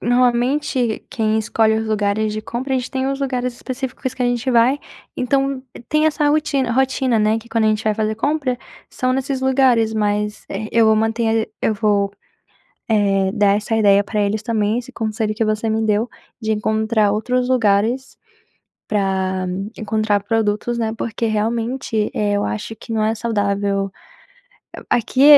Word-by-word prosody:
normalmente, 245 0 +1
quem 220 -1 +1
escolhe 220 0 +2
os 220 0 -2
lugares 210 0 0
de 215 - -3
compra 260 +4 -3
a - - +3
gente 250 - -5
tem 265 0 -1
os 275 - -2
lugares 250 -2 -1
específicos 260 0 -5
que 255 - -3
a - - +3
gente 245 +1 0
vai. 245 +4 +4 0.4
Então 270 +1 0 0.3
tem 305 0 +3
essa 300 -1 +2
rotina 290 -4 +1
rotina, 260 -2 +2
né. 215 +1 +2
Que, 235 +1 -14
quando 225 -1 +1
a - - +4
gente 215 0 +1
vai 215 -1 +2
fazer 215 0 -1
compra, 275 0 0 0.3
são 255 0 0
nesses 270 0 -1
lugares, 255 -4 +3
mas, 210 0 -1
eh, 215 +2 -4
eu 230 -1 +4
vou 220 - +5
manter 225 0 +1 0.2
a - - +2
eu 220 - +2
vou, 200 -2 +1 0.8
eh, 195 -3 +2
dar 205 -2 +3
essa 220 +2 -2
ideia 205 -2 +5
para 210 0 -1
eles 205 +1 0
também. 220 -1 0
Esse 250 +2 -10
conselho 215 -2 -2
que 225 +1 0
você 215 +1 0
me 220 0 +1
deu 215 +3 +1 0.3
de 220 0 -1
encontrar 215 0 +1
outros 250 +4 0
lugares 230 +2 +1 0.7
pra 190 -2 0 0.3
encontrar 215 -2 0
produtos, 225 +2 0
né. 220 -1 -1
Porque 230 +1 -2
realmente, 225 +1 -1
eh, 205 -1 0
eu 205 - 0
acho 105 - -4
que 230 - -13
não 215 -1 +1
é 220 +1 +1
saudável. 200 -3 -1 1.0
A - - +4
aqui 255 +4 +1
220 Hz, 175 wpm, -20 LUFS, 210-250 Hz, 1.0 s, vou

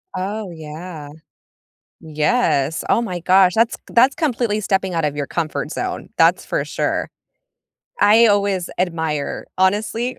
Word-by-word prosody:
Oh, 200 +1 -4
yeah. 155 -1 -9 0.9
Yes. 155 - 0
Oh - - +3
my 185 -7 -4
gosh. 185 +1 +4
That's 230 +1 +2
that's 255 +4 +4
completely 240 -9 0
stepping 190 -2 0
out 165 -2 0
of 145 -1 -2
your 145 -1 -3
comfort 160 -3 -3
zone. - - -4
That's - - +3
for - - -1
sure. - - -2 0.9
I 225 +3 +6
always 200 -3 +1
admire. 160 -5 -2
Honestly, 220 +6 0
185 Hz, 130 wpm, -20 LUFS, 160-220 Hz, 0.9 s, I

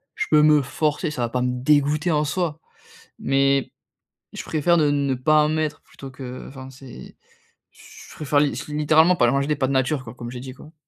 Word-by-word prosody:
Je 425 - -2
peux 150 - +6
me 150 -2 +4
forcer, 150 +3 -2
ça 125 - -5
va 120 - -1
pas 125 +1 -2
me 125 - 0
dégoûter 150 +3 +2
en 150 -1 +1
soi, 160 0 -2 0.6
mais 135 0 +1 0.6
je - - -6
préfère 165 +2 +1
ne 150 -2 +3
ne 140 -2 0
pas 150 +4 +3
en 150 - 0
mettre 155 -1 -2
plutôt 135 - -12
que 130 -1 -9
enfin 130 -1 -10
c'est 135 - -13 0.5
j - - -20 0.3
je - - -14
préfère 145 -1 0
li 145 -1 +2 0.2
littéralement 155 +4 +3
pas 120 - +3
manger 140 +1 0
des 150 - 0
pâtes 130 -1 0
nature 130 +1 0
quoi, 110 - -9
comme 120 -1 -8
j'ai 125 - -7
dit 130 0 -9
quoi. 150 +4 -16
145 Hz, 210 wpm, -22 LUFS, 130-155 Hz, 0.6 s, peux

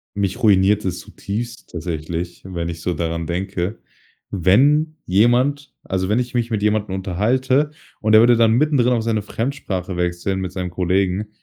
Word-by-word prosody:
Mich 100 +4 -2
ruiniert 100 0 +4
es 90 -1 -2
zutiefst 115 +6 -6
tatsächlich, 85 +1 -5
wenn 85 -3 -4
ich 85 -1 -6
so 90 - -1
daran 85 0 -3
denke. 90 +3 -3 0.5
Wenn 145 - +3
jemand 125 +9 +2
also, 95 -1 -2
wenn 110 +3 +2
ich 125 0 -3
mich 120 0 0
mit 110 -2 0
jemandem 105 -2 0
unterhalte 125 +10 +1 0.3
und 110 0 +2
er 110 - +9
würde 120 +2 +6
dann 115 -1 +4
mittendrin 125 -2 +3
auf 115 -2 0
seine 110 -2 0
Fremdsprache 100 -6 -4
wechseln 90 +2 -1
mit 90 -1 -4
seinem 90 -1 -4
Kollegen. 95 +3 0
100 Hz, 165 wpm, -20 LUFS, 90-120 Hz, 0.5 s, er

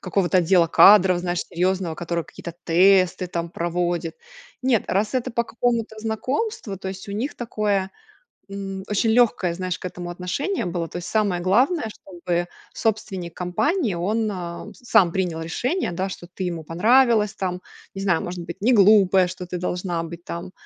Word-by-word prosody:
какого-то 185 0 +1
отдела 175 0 +4
кадров, 185 +1 +7
знаешь, 175 0 -2
серьёзного, 180 -1 -1
который 170 0 -3
какие-то 170 - -9
тесты, 185 +1 +4
там, 170 -1 -4
проводит. 170 -1 -2 0.5
Нет, 255 -5 +2
раз 210 +4 0
это 255 0 -1
по 235 0 0
какому-то 230 -1 -1
знакомству, 225 - -3
то 190 - -5
есть 190 +1 -8
у 200 - -5
них 235 +8 -3
такое, 205 -5 -1 0.6
м, 195 -1 -5
очень 210 +2 +1
лёгкое, 220 -7 +3
знаешь, 185 0 -3
к - - -10
этому 175 0 -7
отношение 185 - -3
было. 170 -1 -3
То - - -7
есть 175 - -6
самое 205 -5 +1
главное, 240 - +2
чтобы 175 -3 -4 0.3
собственник 200 -6 -2
компании 220 - 0
он, 215 +6 -1
а, 175 -2 -6
сам 220 -8 +3
принял 180 -3 -1
решение, 245 - -2
да, 185 +3 -2
что 180 - -8
ты 185 +1 -5
ему 165 -2 -5
понравилась, 215 +5 +3
там. 180 -1 -3 0.3
Не 195 - -4
знаю, 190 -4 +1
может 175 0 -5
быть, 170 0 -7
не 245 +4 +4
глупая, 195 -3 +5
что 180 0 -7
ты 180 0 -5
должна 180 -1 -2
быть, 170 +1 -9
там, 170 +2 -6
185 Hz, 170 wpm, -23 LUFS, 175-215 Hz, 0.6 s, кадров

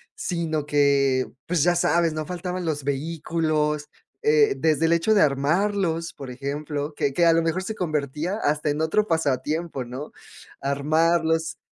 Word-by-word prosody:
sino 160 -4 -2
que, 140 -3 +2 0.2
pues, 165 -4 +1
ya 175 +1 +3
sabes, 170 -1 +2
no 155 0 -3
faltaban 180 +1 -4
los 150 -3 -2
vehículos, 150 +1 -1 0.3
eh, 440 -2 +4
desde 160 0 +2
el 165 - +3
hecho 170 +6 +2
de 210 - +4
armarlos, 165 +4 +1
por 135 -2 -9
ejemplo, 145 +3 -4
que 140 - 0
que 170 +4 +3
a 165 - +6
lo 165 - +3
mejor 165 +3 -1
se 220 +3 -4
convertía 155 +2 -2
hasta 150 -4 0
en 145 +2 -1
otro 210 +7 +1
pasatiempo, 155 -2 -1
¿no? 130 +5 -7 0.5
Armarlos 160 +3 +1
160 Hz, 155 wpm, -24 LUFS, 145-170 Hz, 0.5 s, a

